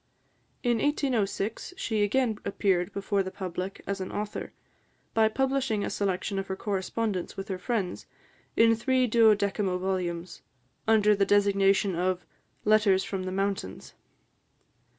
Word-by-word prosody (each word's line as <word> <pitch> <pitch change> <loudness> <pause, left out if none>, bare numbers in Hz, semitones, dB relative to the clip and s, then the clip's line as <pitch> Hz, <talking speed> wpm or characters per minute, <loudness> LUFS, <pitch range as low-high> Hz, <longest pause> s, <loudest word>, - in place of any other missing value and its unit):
In 240 -2 +2
1806, 240 - -1
she 220 - -1
again 220 +1 +1
appeared 185 -3 0
before 200 0 0
the 190 - -3
public 185 0 -5
as 200 -1 -3
an 185 - -5
author, 210 0 -4 0.6
by 220 -1 +4
publishing 265 -3 0
a - - -3
selection 195 0 -1
of 195 - -4
her 190 - -3
correspondence 195 0 -2
with 195 +1 -6
her 185 -1 -3
friends, 195 -3 -2 0.5
in 230 0 +6
three 255 +2 +2
duodecimo 210 -4 +3
volumes, 180 -2 -3 0.5
under 210 -1 +5
the 200 - +2
designation 200 -1 +3
of 180 +1 -1 0.4
"Letters 210 -3 +4
from 190 -2 -4
the 185 - -3
Mountains." 195 - -3
200 Hz, 130 wpm, -28 LUFS, 190-220 Hz, 0.6 s, in